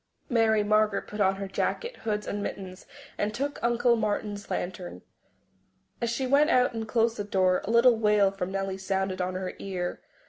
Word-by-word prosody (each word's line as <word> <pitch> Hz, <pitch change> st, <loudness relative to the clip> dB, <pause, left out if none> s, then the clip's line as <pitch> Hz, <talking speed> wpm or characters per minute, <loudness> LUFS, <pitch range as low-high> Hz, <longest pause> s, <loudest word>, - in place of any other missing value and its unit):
Mary 225 Hz, -3 st, +3 dB
Margaret 215 Hz, -1 st, +2 dB
put 210 Hz, 0 st, -5 dB
on 190 Hz, -1 st, +3 dB
her 195 Hz, 0 st, -5 dB
jacket, 475 Hz, -, -2 dB
hood 210 Hz, -1 st, -3 dB
and 205 Hz, -, -3 dB
mittens, 190 Hz, -2 st, -6 dB, 0.3 s
and 210 Hz, +1 st, -1 dB
took 280 Hz, +3 st, -3 dB
Uncle 235 Hz, 0 st, +3 dB
Martin's 210 Hz, -2 st, -2 dB
lantern. 180 Hz, 0 st, -5 dB, 1.0 s
As 235 Hz, -, 0 dB
she 235 Hz, +3 st, -1 dB
went 280 Hz, +4 st, +4 dB
out 250 Hz, -1 st, +3 dB
and 225 Hz, -1 st, -4 dB
closed 230 Hz, +1 st, +1 dB
the 205 Hz, -, -2 dB
door, 185 Hz, -2 st, +2 dB
a -, -, -5 dB
little 235 Hz, +1 st, +5 dB
wail 210 Hz, -2 st, +4 dB
from 190 Hz, -1 st, -4 dB
Nellie 195 Hz, 0 st, -3 dB
sounded 190 Hz, -1 st, -1 dB
on 180 Hz, 0 st, -2 dB
her 185 Hz, 0 st, -4 dB
ear. 180 Hz, -2 st, -4 dB
210 Hz, 180 wpm, -27 LUFS, 190-230 Hz, 1.0 s, little